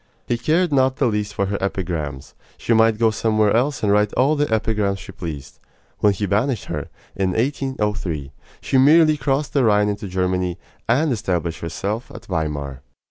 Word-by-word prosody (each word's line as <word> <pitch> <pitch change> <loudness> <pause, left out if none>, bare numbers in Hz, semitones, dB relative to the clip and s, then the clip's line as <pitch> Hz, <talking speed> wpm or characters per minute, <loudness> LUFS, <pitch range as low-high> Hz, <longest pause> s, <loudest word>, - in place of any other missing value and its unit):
He 120 - 0
cared 160 +6 +1
not 130 -1 +3
the 135 - +1
least 105 -2 -1
for 100 - 0
her 100 +1 -2
epigrams. 85 -8 -3 0.2
She 115 - 0
might 110 -1 +4
go 115 0 +3
somewhere 110 -1 +2
else 135 +3 0
and 105 - +3
write 105 0 +3
all 140 +4 +3
the 145 -4 0
epigrams 105 -3 0
she 95 - -10
pleased. 80 -8 -8 0.4
When 105 - +4
he 100 +1 -2
banished 110 +4 0
her, - - -4 0.3
in 95 -1 0
1803, 105 - -2 0.3
she 135 - +1
merely 155 +3 +6
crossed 140 -1 -1
the 140 - +3
Rhine 105 -2 +3
into 100 0 -4
Germany, 90 -1 -1 0.3
and 140 +6 +3
established 90 -7 -2
herself 100 +8 -4
at - - -11
Weimar. 75 -6 -3
105 Hz, 175 wpm, -21 LUFS, 95-130 Hz, 0.4 s, merely